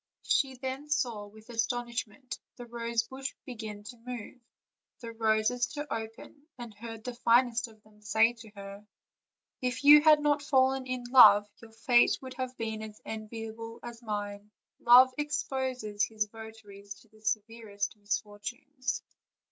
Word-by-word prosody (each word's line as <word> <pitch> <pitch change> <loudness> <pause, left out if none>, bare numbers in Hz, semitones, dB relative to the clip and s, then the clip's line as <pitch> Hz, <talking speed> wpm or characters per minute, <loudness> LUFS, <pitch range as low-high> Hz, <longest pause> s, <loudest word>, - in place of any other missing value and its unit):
She 265 -2 +1
then 265 +3 -5
saw 230 -8 -1
with 215 +1 -17
astonishment 235 +1 -3 0.2
the 245 - -9
rose 235 -1 -2
bush 265 +3 -6
begin 215 -4 -7
to 240 +3 -10
move, 245 0 -8 0.6
the 230 -1 -7
roses 225 +2 +1
to 295 -1 -4
open, 225 +6 -8
and 240 -3 -8
heard 225 +1 -9
the 250 - -5
finest 240 0 +3
of 215 -2 -19
them 210 0 -23
say 220 +2 +3
to 230 -2 -13
her: 200 +1 -10 0.7
"If 250 +2 -2
you 295 +1 +10
had 305 -1 +6
not 295 0 +2
fallen 265 -2 +2
in 255 -1 -3
love 210 -5 +8
your 230 -1 -13
fate 240 +2 +3
would 260 -1 -9
have 255 0 -4
been 220 -1 -4
as 215 -1 -9
enviable 225 +1 -7
as 235 0 -9
mine; 205 -2 -5 0.3
Love 250 +2 +7
exposes 260 -7 -2
his 215 -1 -2
votaries 210 -2 -11
to 225 - -22
the 215 0 -22
severest 215 -1 -3
misfortunes. 225 +7 -4
230 Hz, 150 wpm, -30 LUFS, 215-255 Hz, 0.7 s, you